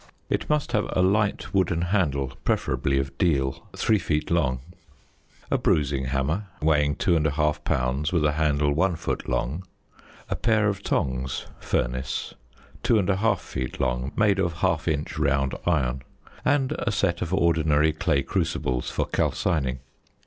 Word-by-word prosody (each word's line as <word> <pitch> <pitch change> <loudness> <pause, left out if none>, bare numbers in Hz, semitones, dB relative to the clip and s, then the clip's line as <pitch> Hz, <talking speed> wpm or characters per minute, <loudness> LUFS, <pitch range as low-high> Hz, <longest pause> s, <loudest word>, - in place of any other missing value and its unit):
It - - -1
must 150 -1 +1
have 105 - +1
a 90 - +3
light 100 +2 +1
wooden 90 -3 +2
handle 70 -8 0
(preferably 70 0 0
of 70 0 -2
deal) 70 -7 +1
3 110 -2 +3
feet 75 -2 -1
long. 70 -7 +1 0.9
A - - +2
bruising 70 -3 +1
hammer, 70 +10 -1
weighing 75 -2 +2
2 85 -3 +2
1/2 75 0 0
pounds, 65 +5 0
with 85 -4 +2
a 75 - +3
handle 75 -1 +1
1 90 +4 +2
foot - - -3
long. 65 +8 -1 0.6
A - - -1
pair 110 -2 +2
of 100 -1 -3
tongs 65 -6 -1
(furnace) 65 +1 -2 0.5
2 115 - +3
1/2 100 +2 +2
feet - - -5
long, 60 +3 -1
made 100 -2 +3
of 90 -3 0
1/2 85 -2 0
inch 75 -1 -3
round 70 -1 +1
iron. 65 -6 +1 0.4
And 135 -1 +2
a 120 - 0
set 85 -4 0
of 90 - -2
ordinary 80 -4 +3
clay 80 -5 +1
crucibles 65 -1 -1
for - - -1
calcining. 70 -7 0
80 Hz, 150 wpm, -25 LUFS, 70-95 Hz, 0.9 s, a